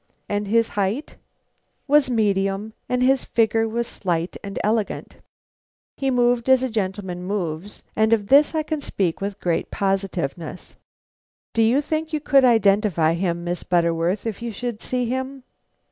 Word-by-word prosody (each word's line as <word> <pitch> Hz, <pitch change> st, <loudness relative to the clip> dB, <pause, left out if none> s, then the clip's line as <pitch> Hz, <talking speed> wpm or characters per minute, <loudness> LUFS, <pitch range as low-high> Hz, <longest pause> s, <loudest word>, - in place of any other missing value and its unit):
"And 205 Hz, 0 st, -2 dB
his 230 Hz, +2 st, +2 dB
height?" 205 Hz, +8 st, -2 dB, 0.7 s
"Was 290 Hz, -2 st, +4 dB
medium, 205 Hz, -2 st, 0 dB, 0.2 s
and 250 Hz, 0 st, +1 dB
his 265 Hz, +1 st, +3 dB
figure 225 Hz, 0 st, +1 dB
slight 175 Hz, -6 st, -3 dB
and 200 Hz, -1 st, -6 dB
elegant. 215 Hz, 0 st, -1 dB, 0.8 s
He 270 Hz, -, -1 dB
moved 245 Hz, -1 st, +2 dB
as 260 Hz, -1 st, +5 dB
a 260 Hz, -, -1 dB
gentleman 190 Hz, -4 st, -3 dB
moves; 185 Hz, -1 st, -4 dB
of 220 Hz, -1 st, +2 dB
this 285 Hz, +4 st, +5 dB
I 310 Hz, -, +1 dB
can 305 Hz, -1 st, -3 dB
speak 185 Hz, -10 st, -2 dB
with 200 Hz, 0 st, -4 dB
great 170 Hz, -2 st, -1 dB
positiveness." 185 Hz, -5 st, -3 dB, 0.8 s
"Do 230 Hz, -, +2 dB
you 235 Hz, +6 st, +4 dB
think 315 Hz, +2 st, -3 dB
you 305 Hz, -, +1 dB
could 275 Hz, -2 st, +4 dB
identify 200 Hz, -8 st, +3 dB
him, 170 Hz, -1 st, -1 dB
Miss 175 Hz, 0 st, -3 dB
Butterworth, 170 Hz, +2 st, +1 dB
if 225 Hz, -1 st, -4 dB
you 235 Hz, -1 st, -3 dB
should 230 Hz, +1 st, -5 dB
see 250 Hz, -1 st, -1 dB
him?" 260 Hz, +2 st, -4 dB
215 Hz, 145 wpm, -23 LUFS, 190-250 Hz, 0.8 s, as